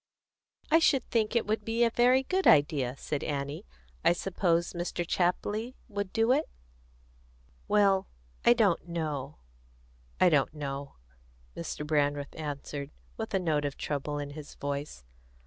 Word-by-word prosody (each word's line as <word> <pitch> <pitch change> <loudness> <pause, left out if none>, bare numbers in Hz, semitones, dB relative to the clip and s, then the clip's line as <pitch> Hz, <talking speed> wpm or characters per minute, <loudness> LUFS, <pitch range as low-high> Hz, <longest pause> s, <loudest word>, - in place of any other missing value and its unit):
"I 325 - +7
should 275 -6 +3
think 220 -1 +1
it 235 - +2
would 215 0 -1
be 225 +2 +1
a 230 - +3
very 250 +3 +4
good 375 +7 +1
idea," 145 -4 +4
said 145 +1 -3
Annie. 140 - -4 0.4
"I - - +5
suppose 175 -1 0
Mr. 175 0 -3
Chapley 205 +8 0
would 200 -4 -4
do 225 +2 +2
it?" 295 +4 +2 1.2
"Well, 200 -2 +3 0.4
I 240 - +7
don't 205 -8 +2
know 150 -4 -3 0.8
I 185 - +6
don't 150 -1 +2
know," 140 -1 -5 0.6
Mr. 150 - -5
Brandreth 145 -2 0
answered, 145 -2 -5 0.3
with 220 -2 -4
a - - +3
note 155 -5 0
of 145 -1 -3
trouble 145 0 -3
in 145 -1 -4
his 150 0 -9
voice. 140 - -4
170 Hz, 145 wpm, -29 LUFS, 145-215 Hz, 1.2 s, I